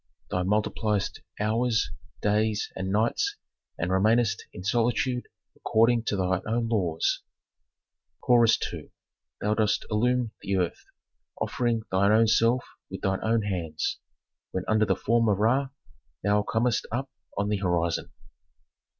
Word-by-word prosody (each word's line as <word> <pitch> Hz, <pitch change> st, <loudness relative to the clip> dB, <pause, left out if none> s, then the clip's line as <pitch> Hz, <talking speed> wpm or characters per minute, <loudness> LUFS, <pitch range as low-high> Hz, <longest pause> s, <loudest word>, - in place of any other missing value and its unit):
Thou 90 Hz, -, 0 dB
multipliest 105 Hz, +1 st, 0 dB, 0.2 s
hours, 110 Hz, +2 st, +1 dB, 0.3 s
days, 105 Hz, +1 st, +1 dB
and 95 Hz, 0 st, -3 dB
nights, 110 Hz, +3 st, +1 dB, 0.4 s
and 85 Hz, +3 st, -1 dB
remainest 110 Hz, +4 st, +2 dB
in 90 Hz, -, -9 dB
solitude 120 Hz, +4 st, 0 dB, 0.3 s
according 115 Hz, +1 st, +2 dB
to 105 Hz, -, 0 dB
thy 95 Hz, -1 st, 0 dB
own 115 Hz, +1 st, 0 dB
laws." 90 Hz, -8 st, 0 dB, 1.0 s
Chorus 120 Hz, -2 st, +5 dB, 0.2 s
II. -, -, -8 dB, 0.5 s
"Thou 105 Hz, +1 st, +1 dB
dost 110 Hz, -1 st, +1 dB
illumine 120 Hz, +1 st, +1 dB
the 100 Hz, -1 st, -1 dB
earth, 90 Hz, -2 st, -2 dB, 0.5 s
offering 120 Hz, -2 st, 0 dB
thy 100 Hz, +2 st, +3 dB
own 110 Hz, +1 st, +5 dB
self 115 Hz, +3 st, +3 dB, 0.2 s
with -, -, -7 dB
thy 95 Hz, 0 st, 0 dB
own 110 Hz, 0 st, +1 dB
hands, 85 Hz, -6 st, -2 dB, 0.5 s
when 95 Hz, -, -3 dB
under 110 Hz, 0 st, +3 dB
the -, -, +2 dB
form 115 Hz, 0 st, +2 dB
of 100 Hz, -, +2 dB
Ra 130 Hz, +6 st, +2 dB, 0.5 s
thou 105 Hz, +1 st, +3 dB
comest 110 Hz, +2 st, 0 dB
up 130 Hz, +4 st, -3 dB, 0.3 s
on 100 Hz, +1 st, 0 dB
the 105 Hz, -, +1 dB
horizon." 85 Hz, -3 st, 0 dB
110 Hz, 135 wpm, -27 LUFS, 95-115 Hz, 1.0 s, Chorus